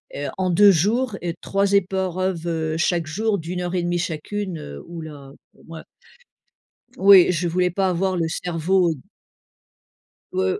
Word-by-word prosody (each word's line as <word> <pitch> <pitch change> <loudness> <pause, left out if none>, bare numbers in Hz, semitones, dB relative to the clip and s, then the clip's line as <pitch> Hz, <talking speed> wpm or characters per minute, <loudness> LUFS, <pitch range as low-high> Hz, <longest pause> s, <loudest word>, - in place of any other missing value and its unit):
heu, 145 - -4
en 185 -1 0
2 200 +3 +6
jours 210 - 0
et 175 -1 -3
3 200 0 0
épreuves 180 -4 -1
chaque 170 0 0
jour. 210 +6 -1
D'1 175 +2 -5
heure 175 +1 -3
et 175 - 0
1/2 175 0 -1
chacune, 180 +3 -4
heu, 70 0 -9
oula, 155 -5 -9 0.3
heu, - - -21
moi 165 -1 -10 1.1
Oui, 190 -3 +7
je 175 0 -1
voulais 180 +2 +1
pas 190 +2 0
avoir 185 +1 0
le 165 -2 0
cerveau 175 +1 0 1.4
heu 95 0 0
175 Hz, 145 wpm, -22 LUFS, 165-190 Hz, 1.4 s, Oui